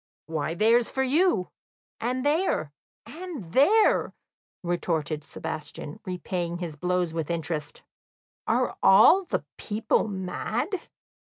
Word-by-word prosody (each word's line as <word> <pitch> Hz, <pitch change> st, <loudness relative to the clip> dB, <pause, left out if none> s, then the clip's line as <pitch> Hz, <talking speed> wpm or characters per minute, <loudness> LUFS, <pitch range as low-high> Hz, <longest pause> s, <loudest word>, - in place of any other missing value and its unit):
"Why, 160 Hz, 0 st, -2 dB
there's 230 Hz, +5 st, +4 dB
for 265 Hz, -, 0 dB
you, 285 Hz, -, +2 dB, 0.5 s
and 255 Hz, +3 st, -2 dB
there, 290 Hz, -, +1 dB, 0.3 s
and 310 Hz, -, -8 dB
there!" 410 Hz, +12 st, +4 dB, 0.5 s
retorted 160 Hz, -3 st, -1 dB
Sebastian, 150 Hz, -1 st, -7 dB
repaying 180 Hz, -1 st, -3 dB
his 170 Hz, -4 st, -5 dB
blows 180 Hz, +1 st, 0 dB
with 165 Hz, -2 st, -3 dB
interest. 160 Hz, -3 st, -3 dB, 0.6 s
"Are -, -, +1 dB
all 270 Hz, -, +7 dB
the -, -, -2 dB
people 215 Hz, +1 st, 0 dB
mad?" 195 Hz, -, -3 dB
180 Hz, 105 wpm, -26 LUFS, 165-255 Hz, 0.6 s, all